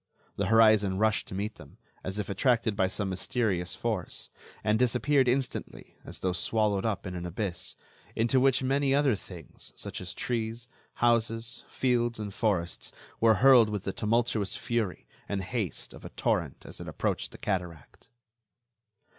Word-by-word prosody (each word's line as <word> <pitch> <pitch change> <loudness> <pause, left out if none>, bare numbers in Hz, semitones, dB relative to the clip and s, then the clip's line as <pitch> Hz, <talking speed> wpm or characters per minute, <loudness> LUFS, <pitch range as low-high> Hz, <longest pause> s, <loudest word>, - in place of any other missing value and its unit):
The 100 - -1
horizon 110 -3 +5
rushed 110 +1 +2
to - - -7
meet 105 +2 -3
them, 70 -2 -14 0.3
as 95 +2 -4
if 105 - -2
attracted 115 +1 +2
by 95 -2 +2
some 100 0 -3
mysterious 95 -1 -1
force, - - -3 0.3
and 110 +1 +2
disappeared 130 +2 +3
instantly 130 +1 -2
as - - -9
though 95 -1 0
swallowed 105 +2 +1
up 105 -3 -2
in 95 - -4
an 90 -1 -5
abyss, 90 0 -3 0.4
into 120 +3 +3
which 130 0 +3
many 135 +1 +2
other 140 -3 +4
things, 90 -5 -10
such - - -6
as 90 0 -6
trees, 115 0 -3 0.3
houses, 115 0 +1
fields 120 -2 +1
and 105 -2 -5
forests, 95 -6 -1 0.3
were 110 -1 +5
hurled 125 -5 +8
with 105 -2 -3
the 95 - -3
tumultuous 110 -2 0
fury 115 -6 -2 0.2
and 100 -2 -1
haste 100 -2 -3
of - - -12
a - - -7
torrent - - -1
as - - -9
it - - -7
approached - - -2
the - - -11
cataract. 90 -6 -4
110 Hz, 160 wpm, -29 LUFS, 95-120 Hz, 0.4 s, hurled